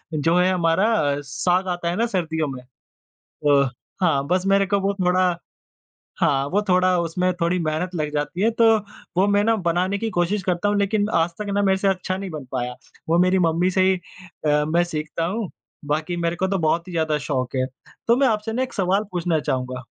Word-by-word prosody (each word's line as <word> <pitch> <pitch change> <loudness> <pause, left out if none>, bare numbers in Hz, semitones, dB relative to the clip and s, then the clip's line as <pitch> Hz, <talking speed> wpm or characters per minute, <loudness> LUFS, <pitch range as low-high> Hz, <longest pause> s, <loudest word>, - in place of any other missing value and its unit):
जो 165 +4 +2
है 180 +1 +3
हमारा 180 +6 +2 0.2
अ, - - -5
साग 180 +7 0
आता 175 -1 -2
है 175 - -1
ना 230 - +1
सर्दियों 160 -7 -1
में। 130 -2 -6 0.6
अ, 140 -3 +1 0.3
हाँ 145 -6 +2
बस 185 +1 +1
मेरे 195 0 +4
को 200 +1 +1
वो 200 +1 0
थोड़ा 180 -1 +2 0.8
हाँ, 135 0 +2
वो 205 +3 +1
थोड़ा 185 0 +3
उसमें 180 +2 0
थोड़ी 170 +2 +2
मेहनत 165 +3 -2
लग 150 -2 -2
जाती 150 +5 -2
है 225 - +4
तो 230 - +6 0.5
वो 195 +2 +4
मैं 205 0 +3
ना 225 +1 +3
बनाने 180 +4 +1
की 225 +2 -2
कोशिश 185 +2 0
करता 185 +2 0
हूँ 205 - +1
लेकिन 205 +1 +1
आज 165 +1 +3
तक 210 - -4
ना 205 - +2
मेरे 190 -1 +3
से 195 - 0
अच्छा 185 0 -1
नहीं 195 -1 -5
बन 150 -5 -7
पाया। 125 -1 -3 0.3
वो 170 - +4
मेरी 185 +1 +3
मम्मी 170 +2 +2
से 185 - +2
ही 190 - +3 0.5
अ, 150 0 +3
मैं 170 +3 +2
सीखता 160 0 -3
हूँ 200 +2 -3 0.4
बाकी 155 +4 -2
मेरे 170 0 -1
को 190 +2 -1
तो 195 0 0
बहुत 165 +2 0
ही - - -8
ज़्यादा 160 -2 0
शौक 130 -2 -2
है। 130 0 +1 0.4
तो 235 - +5
मैं 270 0 +3
आपसे 220 0 -1
ना 255 +3 0
एक 260 - -6
सवाल 195 +1 +1
पूछना 170 -3 0
चाहूँगा? 130 -2 -3
180 Hz, 215 wpm, -22 LUFS, 155-195 Hz, 0.8 s, तो